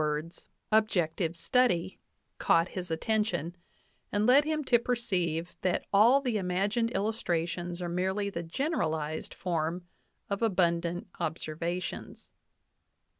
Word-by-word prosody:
JWtflJ,, 150 0 0
DAVIS 165 +2 -14 0.2
"objective 180 -6 +1
study," 185 -3 +1 0.4
caught 165 +2 +3
his 180 -2 -5
attention, 180 -1 -1 0.6
and 205 +1 +1
led 270 +5 +6
him 310 -1 -1
to 240 -3 +4
perceive 180 -9 -1
that 185 - 0
all 235 +8 +6
the 245 -6 0
imagined 200 +5 0
illustrations 175 -5 -1
are - - -2
merely 190 +4 -1
the 170 - -3
generalized 160 - -2
form 170 0 -2 0.4
of 200 +1 -3
abundant 175 -4 +1
observations. 165 +3 -4
180 Hz, 115 wpm, -30 LUFS, 170-220 Hz, 0.6 s, led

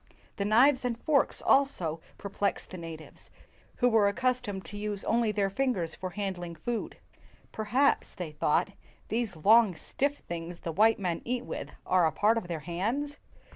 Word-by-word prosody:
The 200 - -1
knives 255 +6 +5
and 245 -2 -1
forks 290 0 +1
also 180 - +2 0.2
perplexed 200 0 -2
the 185 - -6
natives, 165 -2 -9 0.5
who 245 - +3
were 220 -4 +4
accustomed 210 -2 -1
to 205 - -9
use 205 -1 -4
only 230 -1 +2
their 200 -2 0
fingers 195 -10 -1
for 185 - -5
handling 180 -3 -4
food. 230 +9 -4 0.5
"Per 215 - -4
haps," 260 +7 +2
they 175 -5 -5
thought, 155 +5 +1 0.2
" - - -32
these 225 -4 -1
long, 210 +4 +5
stiff 285 - -2
things 170 0 -6
the 165 - -3
white 220 +7 +4
men 175 -4 -2
eat 250 +1 -2
with - - -6
are 180 -3 +4
a - - 0
part 220 +2 +3
of 205 - -10
their 165 -3 -4
hands." 225 - -2
205 Hz, 175 wpm, -29 LUFS, 175-240 Hz, 0.5 s, knives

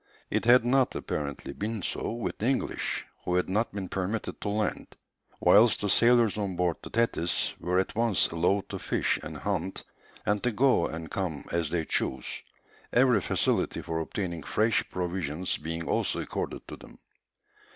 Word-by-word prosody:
It - - 0
had 120 0 +6
not, 130 +1 +3
apparently, 70 -2 -4
been 110 -1 -3
so - - -2
with 115 0 -4
the 110 - 0
English, 135 0 -1 0.2
who 90 - 0
had 90 - +2
not 105 +5 0
been 100 -2 -4
permitted 95 +4 -3
to 105 - -2
land, 105 +1 -2 0.4
whilst 110 +2 +6
the 100 -2 +1
sailors 115 -2 +4
on 100 -3 -2
board 90 -2 +1
the - - -9
Thetis 115 -7 +1
were 90 +2 0
at 95 - +1
once 115 -3 +2
allowed 90 +4 +1
to - - -5
fish - - 0
and 75 0 -6
hunt, 95 +2 -2 0.4
and 105 0 +1
to 125 - +1
go 120 -5 +3
and 80 0 -7
come 90 -7 -3
as 85 -3 0
they 85 -1 -1
chose, - - -1 0.5
every 125 -4 +4
facility - - 0
for 80 -1 -2
obtaining 85 0 -3
fresh 110 +8 +1
provisions 90 -2 -2
being 80 +2 -4
also - - +1
accorded - - -4
to - - -7
them. - - -14
95 Hz, 170 wpm, -28 LUFS, 85-115 Hz, 0.5 s, had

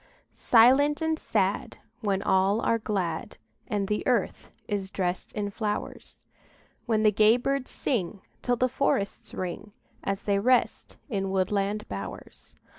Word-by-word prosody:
Silent 265 +6 +5
and 320 -1 0
sad, 195 -2 -1 0.2
When 200 -4 -1
all 190 +3 +3
are 230 -1 +1
glad, 190 -7 -3 0.3
And 205 -2 -1
the 210 +1 -1
earth 240 -6 0 0.2
is 200 -2 -2
dressed 185 -2 -3
in 205 -1 -3
flowers; 210 0 -5 0.6
When 220 -2 +2
the 215 - +5
gay 215 +3 +5
birds 275 +1 -1
sing 200 -6 -2 0.2
Till 245 - +1
the 255 +2 +2
forests 240 -6 -1
ring, 195 +3 -5 0.3
As 195 0 -2
they 200 -1 +1
rest 250 +4 +1
in 195 -7 -2
woodland 195 +2 0
bowers. 100 0 -8
210 Hz, 135 wpm, -27 LUFS, 195-235 Hz, 0.6 s, Silent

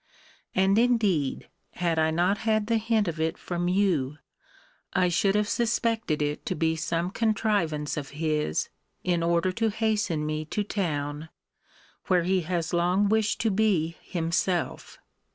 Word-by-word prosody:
And 195 +3 +4
indeed, 210 - +1 0.3
had 170 -2 0
I 160 0 +3
not 180 +5 +1
had 215 -1 +1
the 230 +1 +2
hint 220 -2 +1
of 165 -1 -3
it 160 +2 0
from 175 0 -3
you, 175 -7 +1 0.8
I 180 -1 +3
should 195 +3 +2
have 210 0 +2
suspected 225 -8 0
it 145 0 -2
to - - -1
be 160 +1 +1
some 170 +2 -2
contrivance 205 -10 0
of 140 -2 -4
his, 150 - 0 0.3
in 175 -2 +1
order 170 +2 +2
to 225 +3 0
hasten 210 -7 0
me 155 0 -2
to 210 +7 -2
town, 155 -6 -3 0.8
where 180 -2 +3
he 185 +1 +1
has 170 0 -2
long 180 +4 +2
wished 215 0 +1
to 225 -1 +2
be 190 -6 +1
himself. 170 0 -2
180 Hz, 150 wpm, -27 LUFS, 160-210 Hz, 0.8 s, And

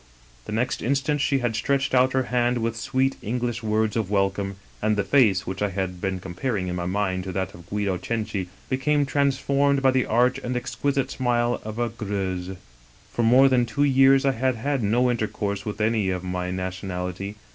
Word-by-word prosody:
" - - -28
The - - -7
next 115 +3 -1
instant 140 +4 0
she 140 -1 +2
had 115 -2 0
stretched 135 +4 0
out 130 0 +4
her 130 0 +2
hand 120 0 +2
with 115 0 -1
sweet 135 +3 0
English 120 +1 -2
words 110 -1 0
of 110 -4 -1
welcome, 100 -1 0 0.3
and 110 0 +2
the 100 - +2
face, 100 -3 +3
which 95 +1 -5
I 105 - +1
had 95 -2 -4
been 95 -2 -2
comparing 95 +2 -3
in 90 - -3
my 90 -1 -3
mind 95 -1 -1
to 95 - -4
that 95 0 -2
of 85 0 -14
Guido's 100 -3 -1
Cenci, 110 -4 -2 0.2
became 145 +2 +1
transformed 140 0 +1
by 130 - +5
the 130 -1 +1
arch 125 +3 +2
and 125 -1 -3
exquisite 135 +3 -1
smile 120 -1 0
of 110 +1 -6
a 120 0 0
Greuse. 95 -4 -4 0.6
For - - 0
more 125 +4 +6
than 130 -2 +3
two 115 +6 0
years 135 0 +5
I 135 - +4
had 130 0 0
had 135 +3 -1
no 120 +4 +2
intercourse 105 -3 -2
with 105 0 -4
any 110 -2 +1
of 90 -1 -2
my 90 0 -3
nationality. 95 +1 -4
110 Hz, 200 wpm, -24 LUFS, 95-130 Hz, 0.6 s, more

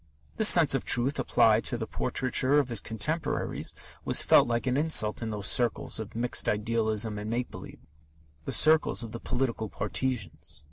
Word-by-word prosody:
This 220 - +6
sense 165 -6 +5
of 135 - -1
truth 135 +4 +1
applied 115 -3 +2
to 120 - -3
the 115 - -4
portraiture 130 +4 0
of 140 -3 +1
his 115 -3 -2
contemporaries 145 +8 -4 0.3
was - - +3
felt - - +4
like 120 -1 -2
an 125 -1 0
insult 140 -9 +1
in 115 - -4
those 105 -2 -5
circles 120 -1 +1
of 110 0 -8
mixed 120 +2 -1
idealism 110 0 -1
and 105 +1 -6
make 120 +2 -3
believe, - - -12 0.6
the - - -4
circles 155 -5 +3
of 115 - -8
the 115 - -7
political 120 -4 -3
partisans. 105 - -4
120 Hz, 175 wpm, -27 LUFS, 110-130 Hz, 0.6 s, This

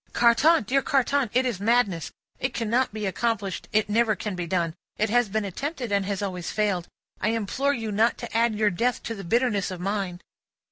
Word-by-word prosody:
"Carton! 240 +6 +5
Dear 270 +6 +2
Carton! 275 -1 +1
It 255 +2 +2
is 235 -7 -1
madness. 205 -6 +1 0.3
It 260 - -2
cannot 235 +3 +1
be 215 0 -4
accomplished, 200 -1 -2
it 215 0 +2
never 220 +1 +2
can 210 +1 -4
be 175 -1 -4
done, 170 -2 0 0.2
it 215 0 0
has 245 -2 +3
been 215 +1 -1
attempted, 255 - -4
and 200 -1 +1
has 200 0 -2
always 180 -3 -3
failed. 200 -5 0 0.3
I 210 - +1
implore 230 +6 0
you 225 -2 -4
not 220 +3 +2
to 235 -2 -7
add 230 -1 +3
your 210 -1 +2
death 235 +7 0
to 230 - -3
the 200 -3 -7
bitterness 215 +1 +1
of 185 -2 -6
mine." 195 -2 -2
215 Hz, 200 wpm, -25 LUFS, 195-240 Hz, 0.3 s, Carton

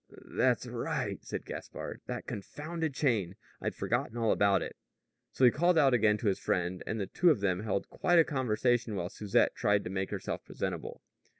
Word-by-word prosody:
"That's - - +1
right," - - -3
said - - -5
Gaspard. - - -7
"That - - -4
confounded 155 - -4
chain! 110 - +1 0.3
I'd - - -2
forgotten 120 - -1
all 115 -2 +2
about 100 -1 +3
it." - - -7 0.6
So 130 - +3
he 120 - +8
called 175 +6 +3
out 140 -4 +5
again 110 -3 +4
to 110 - -2
his 100 - +1
friend, 90 0 -1
and 110 - -2
the 100 - -1
two 175 - +3
of 150 - +4
them 95 -3 +1
held 105 -2 -2
quite 175 -1 +2
a 165 - +8
conversation 120 -4 0
while 90 -2 -2
Susette 105 -1 +1
tried 105 0 +2
to 90 - -5
make 95 0 -2
herself - - -4
presentable. - - -5
110 Hz, 190 wpm, -31 LUFS, 100-135 Hz, 0.6 s, he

